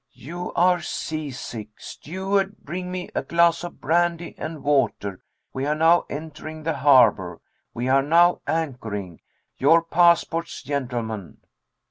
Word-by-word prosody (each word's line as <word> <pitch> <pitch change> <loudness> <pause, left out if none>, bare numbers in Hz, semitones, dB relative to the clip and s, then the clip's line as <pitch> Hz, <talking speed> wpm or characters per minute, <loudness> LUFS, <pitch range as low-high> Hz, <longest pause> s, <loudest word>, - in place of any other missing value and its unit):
'You 175 +8 -7
are 180 0 +3
seasick.' 130 -10 -6
'Steward, 195 +4 -2
bring 180 +4 -6
me 180 -1 -5
a - - -1
glass 170 0 +2
of 175 - -8
brandy 170 +2 0
and 155 -1 -7
water.' 135 -9 0 0.3
'We 130 +1 -2
are 150 - +1
now 165 +2 +4
entering 155 +1 -7
the 160 +1 -1
harbor.' 110 - +4 0.4
'We 120 +2 -2
are 135 +1 +4
now 170 +5 +4
anchoring.' 115 - -3 0.4
'Your 165 +5 +5
passports, 170 0 +2
gentlemen.'" 120 -8 -4
155 Hz, 125 wpm, -23 LUFS, 130-170 Hz, 0.4 s, Your